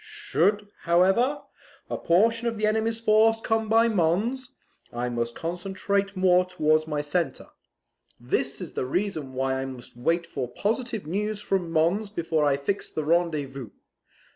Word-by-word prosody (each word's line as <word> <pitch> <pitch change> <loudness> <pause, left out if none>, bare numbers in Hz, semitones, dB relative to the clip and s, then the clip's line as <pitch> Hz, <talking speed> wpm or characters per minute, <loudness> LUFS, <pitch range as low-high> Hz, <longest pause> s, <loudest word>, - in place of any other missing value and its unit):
Should, 400 - 0
however, 190 +11 +2 0.4
a - - -3
portion 230 +7 +2
of 230 -1 -2
the 215 - 0
enemy's 220 +1 0
force 225 0 +4
come 225 -1 0
by 225 +1 +5
Mons, 220 +7 0 0.4
I 120 +1 -2
must 120 -1 -3
concentrate 195 +3 -2
more 180 -1 +4
towards 155 -4 +1
my 150 -1 -2
centre. 165 +3 -2 0.7
This 130 +3 -2
is 180 -5 -7
the 125 - -2
reason 160 -5 -2
why 130 0 -1
I - - -3
must 130 -3 -9
wait 165 +8 0
for 130 -6 -4
positive 220 - -2
news 205 +5 -2
from 190 -4 -1
Mons 170 +6 +1
before 165 -5 0
I 140 -1 +3
fix 140 +8 -3
the 155 - -3
rendezvous. 150 -6 0
180 Hz, 150 wpm, -26 LUFS, 150-215 Hz, 0.7 s, by